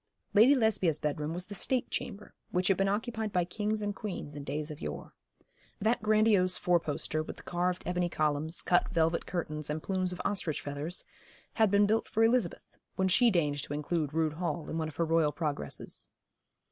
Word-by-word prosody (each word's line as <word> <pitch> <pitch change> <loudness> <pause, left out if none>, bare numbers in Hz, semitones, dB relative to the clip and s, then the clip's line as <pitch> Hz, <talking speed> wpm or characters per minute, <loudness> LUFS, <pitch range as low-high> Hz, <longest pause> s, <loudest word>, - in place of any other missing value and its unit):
Lady 230 +7 +7
Lesbia's 205 - +2
bedroom 150 +1 -2
was 175 +2 -4
the 205 - -8
State 250 +5 -1
chamber, 210 -4 -5 0.2
which 180 +2 +1
had 195 - +3
been 195 - +2
occupied 220 +1 -2
by 180 -2 +1
kings 210 +4 -2
and 205 -1 -2
queens 185 -9 -6
in 145 - -6
days 150 +3 -3
of 150 - -9
yore. 70 -3 -6 0.7
That 225 +4 +1
grandiose 215 -4 +4
four 175 -1 +3
poster, 155 0 -2
with 155 - -7
the - - -12
carved 180 +1 -1
ebony 180 0 0
columns, 155 0 -1
cut 175 - +3
velvet 165 -2 +1
curtains, 155 -4 -3
and 155 +1 -3
plumes 185 -2 -1
of 180 - -6
ostrich 180 -7 0
feathers, 145 +5 -3 0.5
had 220 -2 +3
been 205 +1 +4
built 220 +2 +1
for 225 - +2
Elizabeth, 225 -6 0 0.2
when 190 0 +1
she 240 +6 +5
deigned 150 -7 +1
to 145 - -5
include 150 0 -1
Rood 160 -1 0
Hall 170 -1 -3
in 160 - -2
one 160 - -1
of 155 - -9
her 170 - +1
royal 160 -2 +3
progresses. 145 - -4
175 Hz, 195 wpm, -30 LUFS, 155-205 Hz, 0.7 s, Lady